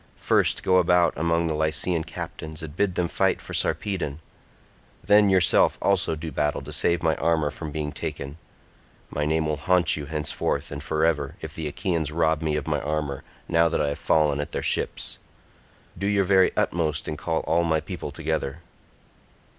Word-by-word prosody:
First - - +2
go 95 0 +4
about 90 -1 +4
among 85 +2 +1
the 80 - 0
Lycian 80 +2 0
captains 80 -1 -7
and 75 -1 -8
bid 95 -1 0
them 90 - +1
fight 95 +2 +1
for - - -9
Sarpedon; 90 -8 -1 0.8
then 105 0 +5
yourself 95 -2 +4
also 95 -5 +1
do 80 +1 -6
battle 75 -1 -1
to 75 +2 -7
save 85 +3 +2
my 80 -1 +2
armour 80 -3 +1
from 80 - -7
being 75 0 -3
taken. 70 0 -6 0.7
My 75 - -1
name 80 +1 +1
will 75 -1 -1
haunt 90 +3 +2
you 75 -2 -6
henceforth 75 -2 -2
and 70 -1 -5
for 80 +3 0
ever 75 -2 0
if 80 0 -7
the 80 -2 -4
Achaeans 80 -1 -2
rob 80 -1 +1
me 80 -2 0
of 75 -2 -2
my 75 -2 -1
armour 75 -2 -3 0.2
now 85 0 +3
that 85 - -1
I 70 - +1
have 70 - -4
fallen 75 -2 +2
at 75 - -4
their - - -2
ships. - - -1 0.8
Do 100 +3 -2
your 100 -1 +3
very 95 0 +4
utmost 80 -3 0
and 75 - -3
call 80 +1 -1
all 85 +2 +1
my 80 -2 +2
people 75 - -6
together." 80 -1 -3
80 Hz, 185 wpm, -25 LUFS, 75-85 Hz, 0.8 s, then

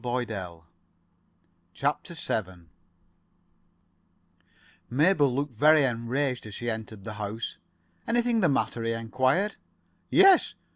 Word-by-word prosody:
[Pg 125 - -4
49] 100 -9 -4 1.1
CHAPTER - - -2
VII 90 -5 -4 2.2
Mabel 145 +1 +3
looked 140 +1 -2
very 150 +5 +5
enraged 125 0 -1
as 105 - -9
she 120 0 -3
entered 110 -2 -7
the 110 - -6
house. 105 +3 -5 0.5
"Anything 235 0 +1
the 180 -6 +3
matter?" 135 -3 -1
he 115 0 -1
enquired. 130 - 0 0.5
"Yes. 385 -1 +5
125 Hz, 105 wpm, -27 LUFS, 110-145 Hz, 2.2 s, very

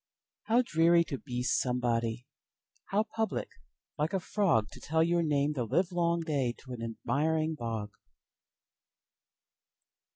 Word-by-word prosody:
How 235 +3 +4
dreary 170 -4 +4
to 140 -5 -5
be 125 -3 -4
somebody! 120 -2 0 0.6
How 205 +2 +1
public, 220 0 -2 0.5
like 155 +5 0
a 190 - +2
frogTo 165 - +1
tell 160 +1 +2
your 170 +1 +2
name 150 -2 +1
the 130 -4 -1
livelong 170 - +1
dayTo 130 -4 -2
an 120 - -6
admiring 155 +7 0
bog! 115 -6 -4
150 Hz, 110 wpm, -31 LUFS, 125-170 Hz, 0.6 s, How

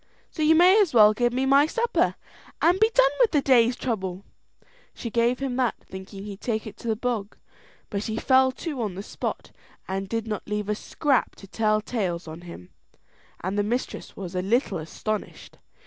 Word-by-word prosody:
So 315 - -6
you 310 +1 +5
may 365 +6 +6
as 345 -10 0
well 215 -1 +8
give 240 +2 +1
me 260 +2 0
my 275 +2 +5
supper, 470 +7 0 0.4
and 355 +3 +3
be 440 +1 +5
done 270 - +5
with 480 - +5
the 300 - +2
day's 245 -2 +4
trouble." 190 -7 -4 0.7
She 235 - -6
gave 235 +2 +2
him 265 -2 -3
that, 250 -3 +1
thinking 190 +1 -9
he'd 205 -1 -8
take 220 -3 -2
it 210 -2 -8
to 235 - -9
the 220 - +1
bog; 220 -3 -3 0.5
but 200 -1 -2
he 220 0 -3
fell 260 +1 +4
to 290 -3 -5
on 205 -5 -3
the 195 - -6
spot, - - -5 0.4
and 195 0 -3
did 225 0 -2
not 215 -2 -5
leave 210 0 -2
a - - +2
scrap 270 +5 0
to - - -13
tell 215 +1 +1
tales 185 -7 -3
on 160 +2 -8
him; 170 - -11 0.7
and 190 +3 -1
the - - +2
mistress 240 +5 -3
was 185 -2 -6
a 180 - -1
little 205 - 0
astonished. 205 +7 -5
225 Hz, 195 wpm, -25 LUFS, 200-260 Hz, 0.7 s, well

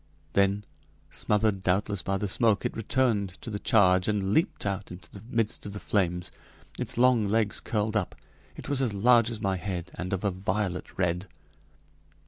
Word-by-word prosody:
Then, 100 +1 +2 0.5
smothered 105 -2 +1
doubtless 95 +1 +1
by 95 +2 -1
the 105 - -2
smoke, 110 +1 +2
it - - -2
returned 110 -5 0
to 115 - -6
the 100 - -3
charge 95 -4 +4
and 100 -2 0
leaped 160 - +1
out 100 -1 -3
into 90 +1 -11
the 100 - -11
midst 115 -3 -1
of 100 - -7
the 100 - -5
flames. 90 -5 -1 0.5
Its - - -4
long 120 -4 +4
legs 110 0 +1
curled 110 0 -1
up. 100 -4 -1 0.4
It - - -9
was 140 -1 +1
as 115 -6 0
large 115 +2 +5
as 110 -3 -4
my 95 -3 0
head, 90 -2 -5
and 90 0 -5
of 95 0 -2
a 100 - +1
violet 95 0 -3
red. 90 +1 0
100 Hz, 180 wpm, -28 LUFS, 95-110 Hz, 0.5 s, large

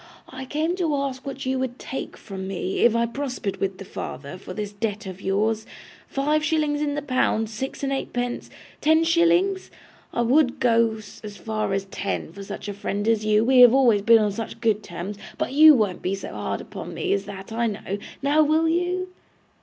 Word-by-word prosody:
I 265 0 -7
came 310 +6 -1
to 325 -5 +1
ask 275 -1 -3
what 275 -1 -5
you 260 0 0
would 260 -1 -3
take 265 - -6
from 190 -2 -7
me, 190 0 -3
if 235 -1 +5
I 235 0 +3
prospered 250 -5 -4
with 195 -1 -2
the 195 - -9
father, 140 -2 -6
for 185 - -9
this 205 +2 -5
debt 210 0 -3
of 190 0 -8
yours. 215 +3 0 0.4
Five 300 +3 0
shillings 305 -2 +1
in 290 -1 0
the 295 - -3
pound, 240 -5 +1
six 265 +6 -5
and 275 0 0
eightpence, 245 -2 -3 0.3
ten 315 +2 +4
shillings? 345 +3 +2 0.4
I - - 0
WOULD 255 +2 +3
go 230 -2 +3 0.3
as 205 -1 -8
far 215 -2 -2
as 195 0 -1
ten 195 0 -4
for 200 - -9
such 195 - -7
a 205 - -3
friend 205 +1 -3
as 220 -2 +2
you, 215 +1 +3
we 260 +1 +5
have 245 0 +9
always 240 -6 +4
been 230 +3 +7
on 210 -2 +1
such 225 +2 -6
good 220 -3 +1
terms, 200 0 -6 0.2
but 255 - -2
you 305 +1 +9
won't 205 -7 0
be 190 +2 -1
so 195 - -7
hard - - -3
upon - - -8
me - - 0
as 200 0 -1
that, 195 0 -9
I 230 +1 0
know. 205 -1 -4 0.2
Now, 290 +2 +4
will 310 +2 +3
you? 355 +2 0
235 Hz, 205 wpm, -24 LUFS, 205-285 Hz, 0.4 s, have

